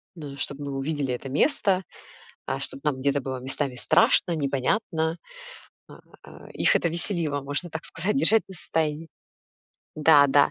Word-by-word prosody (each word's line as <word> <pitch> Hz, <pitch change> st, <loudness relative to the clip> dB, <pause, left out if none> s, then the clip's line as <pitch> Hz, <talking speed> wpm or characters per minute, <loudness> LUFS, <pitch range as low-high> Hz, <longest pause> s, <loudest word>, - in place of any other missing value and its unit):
Ну, 145 Hz, -4 st, -8 dB
чтобы 145 Hz, +1 st, -5 dB
мы 140 Hz, -, -4 dB
увидели 140 Hz, -2 st, -2 dB
это 130 Hz, +2 st, -6 dB
место, 190 Hz, -, +2 dB, 0.6 s
а, -, -, -2 dB
чтоб 140 Hz, -, -4 dB
нам 140 Hz, -3 st, -1 dB
где-то 140 Hz, +1 st, 0 dB
было 130 Hz, -1 st, -5 dB
местами 135 Hz, +1 st, -2 dB
страшно, 170 Hz, +7 st, +3 dB
непонятно. 160 Hz, -, -1 dB, 0.7 s
А -, -, -14 dB, 0.3 s
а -, -, -14 dB
а, -, -, -14 dB
их -, -, +2 dB
это 170 Hz, -, +2 dB
веселило, 165 Hz, -4 st, 0 dB
можно 145 Hz, +5 st, -3 dB
так 160 Hz, +1 st, -6 dB
сказать, 190 Hz, +8 st, -2 dB
держать 225 Hz, -5 st, +4 dB
нас 190 Hz, -2 st, -9 dB
тайи 160 Hz, 0 st, -1 dB, 0.9 s
Да, 150 Hz, -2 st, +6 dB
да. 140 Hz, +1 st, +4 dB
150 Hz, 160 wpm, -25 LUFS, 140-170 Hz, 0.9 s, Да